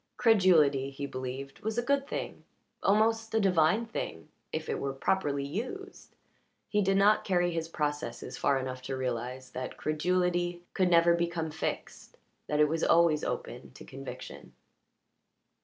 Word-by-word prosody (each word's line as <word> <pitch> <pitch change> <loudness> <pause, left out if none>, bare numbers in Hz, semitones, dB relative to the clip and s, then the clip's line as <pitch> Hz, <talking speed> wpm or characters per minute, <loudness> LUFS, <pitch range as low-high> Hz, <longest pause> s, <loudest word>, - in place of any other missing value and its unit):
Credulity, 165 - +4
he 140 +1 -5
believed, 130 +1 -6
was 220 +1 -3
a 240 - +1
good 280 +2 +1
thing, - - -5 0.4
almost 220 +2 +2
a - - +4
divine 185 +2 +3
thing, 80 - -6 0.2
if - - -4
it - - -2
were 140 -1 -2
properly 140 -1 0
used; 255 - -6 0.5
he 210 - +1
did 195 0 +2
not 205 +2 +4
carry 175 -2 +1
his 165 -1 -2
processes 145 -7 -3
far 140 -1 +2
enough 130 -1 -4
to 130 +1 -4
realize 125 0 -4
that 130 0 -6
credulity 175 +2 0
could 185 -2 +2
never 170 0 +5
become 170 -2 -1
fixed 160 - -5 0.3
that 150 - 0
it 150 - +6
was 160 +2 -1
always 165 -2 +4
open - - -5
to - - -12
conviction. - - -9
165 Hz, 150 wpm, -30 LUFS, 140-195 Hz, 0.5 s, it